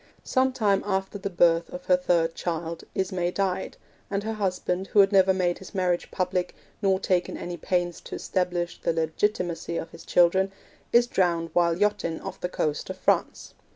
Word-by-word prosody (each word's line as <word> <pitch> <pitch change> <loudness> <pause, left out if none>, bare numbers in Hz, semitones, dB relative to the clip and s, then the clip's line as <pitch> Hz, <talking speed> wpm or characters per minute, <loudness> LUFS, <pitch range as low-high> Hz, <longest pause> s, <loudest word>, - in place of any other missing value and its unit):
Some 260 0 +2
time 210 -6 +2
after 195 0 -2
the 200 - -3
birth 170 -2 +3
of 180 0 -8
her 180 - +5
third 170 -2 +1
child, 165 -1 -4
Ismay 185 -2 0
died, 190 0 -2 0.3
and 200 0 -1
her 220 +1 -2
husband, 190 -2 -1
who 210 - +2
had 195 0 +6
never 190 -1 +5
made 180 -2 0
his 190 +2 -12
marriage 180 -2 0
public, 180 -1 -1 0.3
nor 190 -2 +2
taken 180 -2 0
any 175 0 -5
pains 175 -1 -1
to - - -6
establish 180 -2 -2
the 170 - +1
legitimacy 170 +1 -1
of - - -5
his 165 - -12
children, 190 +2 +3 0.4
is 240 +1 +6
drowned 170 -7 0
while 170 -1 +3
yachting 205 -5 0
off - - -8
the 180 - -2
coast 150 -4 -2
of - - -5
France. - - 0
180 Hz, 180 wpm, -26 LUFS, 175-195 Hz, 0.4 s, had